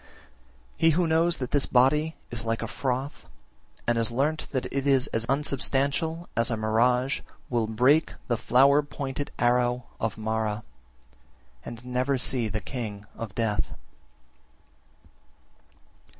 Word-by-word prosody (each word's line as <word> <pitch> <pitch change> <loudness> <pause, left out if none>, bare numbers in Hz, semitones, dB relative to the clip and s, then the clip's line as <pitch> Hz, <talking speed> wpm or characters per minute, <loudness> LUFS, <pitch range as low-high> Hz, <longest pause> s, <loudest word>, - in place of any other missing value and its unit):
46. - - -23 0.5
He 165 - +5
who 170 +3 +2
knows 165 +1 +3
that 125 -2 -4
this 145 -2 +1
body 150 +6 +3 0.2
is 115 -1 -2
like 115 0 -2
froth, 130 +4 -3 0.6
and 120 -1 +1
has 115 - 0
learnt 140 +6 -1
that 130 -3 -1
it 140 0 -1
is 135 -2 +4
as 115 +1 0
unsubstantial 140 +4 0
as 115 0 +2
a 115 - -1
mirage, 125 +5 +2 0.3
will 115 -2 +1
break 130 +8 +3
the 120 - +1
flower 135 +5 +4
pointed 140 -1 -5
arrow 120 0 +2 0.2
of 110 -2 -2
Mara, 110 -1 -2 1.0
and 120 +1 -9
never 125 +2 0
see 125 -2 +1
the 110 0 -3
king 105 -5 -6
of 110 -3 -7
death. 110 -3 -1
125 Hz, 135 wpm, -27 LUFS, 115-140 Hz, 1.0 s, He